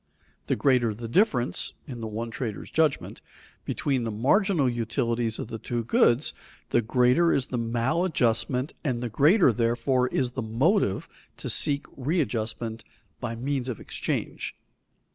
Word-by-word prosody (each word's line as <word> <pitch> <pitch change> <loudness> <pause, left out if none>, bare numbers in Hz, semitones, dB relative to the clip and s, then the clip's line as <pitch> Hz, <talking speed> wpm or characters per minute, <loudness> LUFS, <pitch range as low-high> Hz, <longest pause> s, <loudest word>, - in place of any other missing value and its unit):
The - - +2
greater 125 -6 +2
the 115 +2 -6
difference, 130 - +1
in 125 -5 -7
the 110 - -3
one 115 +2 -4
trader's 110 -3 -5
judgment, 155 -3 0 0.4
between 135 -4 -1
the 115 - -2
marginal 145 - +2
utilities 115 -1 -1
of - - -5
the 115 - -5
two 120 +1 -3
goods, 120 +3 +3 0.4
the 120 - +3
greater 125 +8 +3
is 135 - +1
the 125 - -3
maladjustment, 125 +1 0
and 125 -5 -1
the 120 - -2
greater, 150 - +5
therefore, 120 +3 +1
is 125 -1 0
the 130 - -4
motive 115 - +1 0.3
to - - -3
seek 140 -1 +1
readjustment 115 -6 -2 0.4
by 120 -2 -4
means 130 +1 -2
of 120 - -4
exchange. - - -3
125 Hz, 145 wpm, -26 LUFS, 115-140 Hz, 0.4 s, greater